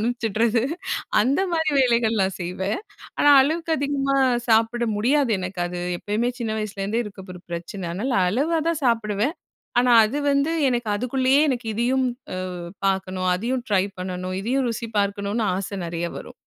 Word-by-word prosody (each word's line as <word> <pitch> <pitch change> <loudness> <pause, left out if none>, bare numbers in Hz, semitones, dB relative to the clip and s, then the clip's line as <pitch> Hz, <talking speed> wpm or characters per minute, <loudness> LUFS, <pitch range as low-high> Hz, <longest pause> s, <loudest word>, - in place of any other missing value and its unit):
அனுப்பிச்சிட்றது. 230 0 +1 0.6
அந்த 260 - +2
மாதிரி 320 -2 +1
வேலைகள்லாம் 225 -6 +2
செய்வேன். 190 - -2 0.4
ஆனா 290 - +5
அளவுக்கு 320 +5 0
அதிகமா 275 -1 0 0.3
சாப்பிட 225 +2 +3
முடியாது 260 +4 +2
எனக்கு. 185 0 -6
அது 175 0 -5 0.2
எப்பயுமே 215 +4 -1
சின்ன 230 -2 -2
வயசுலேருந்தே 210 +2 -2
இருக்க 195 -2 -10
ஒரு 180 - -12
பிரச்சன. 175 +2 -5
அதனால 245 +8 -2
அளவா 295 - +1
தான் 325 -3 -1
சாப்பிடுவேன்! 225 - +1 0.4
ஆனா 245 0 +4
அது 260 +7 -2
வந்து 280 +3 +2 0.2
எனக்கு 240 -2 -1
அதுக்குள்ளேயே 260 +5 +2
எனக்கு 245 -3 -2
"இதையும் 255 +3 +1 0.3
அ - - -4 0.5
பார்க்கணும், 185 -1 -1
அதையும் 240 +6 -2
ட்ரை 195 -2 +3
பண்ணணும், 185 0 -4
இதையும் 255 +3 0
ருசி 230 0 -4
பார்க்கணும்"னு 200 +2 -1
ஆச 195 - -3 0.2
நெறைய 170 0 -3
வரும்! - - -10
225 Hz, 145 wpm, -23 LUFS, 195-260 Hz, 0.6 s, ஆனா